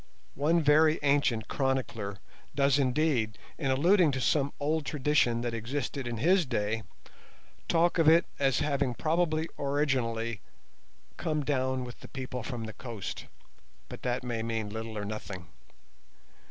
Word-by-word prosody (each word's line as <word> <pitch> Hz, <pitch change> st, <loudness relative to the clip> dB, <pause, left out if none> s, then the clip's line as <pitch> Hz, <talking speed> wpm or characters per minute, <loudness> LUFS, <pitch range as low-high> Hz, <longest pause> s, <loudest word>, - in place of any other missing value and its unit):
One 160 Hz, +4 st, +2 dB
very 155 Hz, +2 st, +5 dB
ancient 140 Hz, -6 st, +2 dB
chronicler 130 Hz, -7 st, -1 dB, 0.4 s
does 140 Hz, 0 st, +3 dB
indeed, 130 Hz, -5 st, +1 dB, 0.2 s
in 140 Hz, -4 st, 0 dB
alluding 165 Hz, +5 st, +4 dB
to 130 Hz, -, -1 dB
some 140 Hz, +4 st, +2 dB
old 155 Hz, +2 st, 0 dB
tradition 140 Hz, -5 st, +1 dB
that 120 Hz, -1 st, -2 dB
existed 125 Hz, +3 st, -3 dB
in 120 Hz, -1 st, -3 dB
his 180 Hz, -, +4 dB
day, 110 Hz, -2 st, -1 dB, 0.9 s
talk 170 Hz, +1 st, +3 dB
of 160 Hz, -, +4 dB
it 165 Hz, +2 st, +6 dB
as 135 Hz, -2 st, +2 dB
having 140 Hz, -4 st, 0 dB
probably 160 Hz, +1 st, +1 dB
originally 125 Hz, -6 st, 0 dB, 0.8 s
"come 155 Hz, -3 st, -1 dB
down 130 Hz, -2 st, 0 dB
with 125 Hz, -1 st, -9 dB
the -, -, -11 dB
people 130 Hz, -2 st, -5 dB
from 120 Hz, -1 st, -5 dB
the 110 Hz, -1 st, -6 dB
coast", 115 Hz, -7 st, -6 dB, 0.6 s
but -, -, -8 dB
that 125 Hz, 0 st, -1 dB
may 120 Hz, -2 st, -2 dB
mean 110 Hz, -2 st, -2 dB
little 110 Hz, 0 st, -5 dB
or 105 Hz, -, -3 dB
nothing. 100 Hz, -4 st, -6 dB
130 Hz, 140 wpm, -29 LUFS, 115-150 Hz, 0.9 s, it